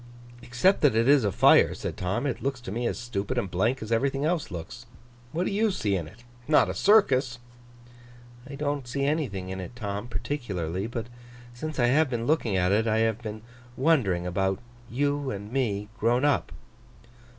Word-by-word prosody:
'Except 125 +12 +2
that 145 -7 +4
it 115 +2 +3
is 140 -2 +5
a 100 - +1
fire,' - - +5
said - - -5
Tom, 95 +9 -2
'it 140 - -2
looks 135 -1 -2
to 120 -6 -8
me 120 +3 -1
as - - -2
stupid 105 -5 -3
and 95 - -1
blank 110 +7 0
as 110 - -8
everything 135 +4 +1
else 165 -1 0
looks. 85 -3 -8 0.4
What 175 +3 -1
do - - -1
you 215 +2 +2
see 105 - -1
in 85 -5 -3
it? 105 +9 -16 0.2
Not 150 - +4
a - - -5
circus?' 135 - +3 1.1
'I 140 - -6
don't 145 -2 -2
see 140 +3 -2
anything 125 - -2
in 95 0 -5
it, 95 +6 -9
Tom, 105 -1 -4
particularly. 100 - -3
But 115 -1 -4 0.5
since 155 +6 -6
I 120 - +3
have 145 +4 +3
been 120 -2 -2
looking 120 -9 +1
at 90 0 +2
it, 110 +3 +2
I 110 0 +2
have 115 0 +1
been 110 -1 -7 0.3
wondering 125 - +2
about 95 +1 0 0.3
you 145 +2 -1
and 105 0 -6
me, 105 -6 -1
grown 120 +5 +2
up. 145 -2 +1
120 Hz, 190 wpm, -27 LUFS, 100-140 Hz, 1.1 s, is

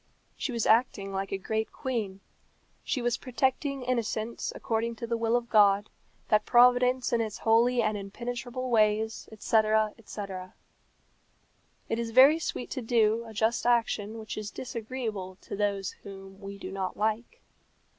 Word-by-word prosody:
She 275 - -3
was 235 -2 -1
acting 220 -4 +2
like 195 0 -3
a 195 - -1
great 220 +3 -2
queen; 220 -8 -3 0.6
she 255 - -2
was 240 -1 +1
protecting 265 +1 -1
innocence 235 -2 -2
according 230 +1 -2
to 235 - -5
the 235 0 -1
will 230 0 +1
of 240 -1 0
God 205 -2 +4 0.4
that 215 0 +4
Providence 250 +1 +4
in 235 - +3
its 215 -2 -3
holy 235 +2 +3
and 215 0 0
impenetrable 245 +5 -5
ways, 220 0 +1
etc., 220 -1 +2
etc. 195 -4 -7 1.3
It 225 - -1
is 230 -1 -2
very 270 +7 +7
sweet 250 - -4
to 260 - -3
do 225 -1 +2
a 220 - -10
just 225 +3 +1
action 225 -2 +1
which 220 -1 -7
is 210 -1 -5
disagreeable 220 -6 -5
to - - -6
those 200 -2 -1
whom 195 -1 -11
we 200 0 -7
do 190 -1 -7
not 190 -1 -3
like. 220 - -2
225 Hz, 155 wpm, -28 LUFS, 205-240 Hz, 1.3 s, very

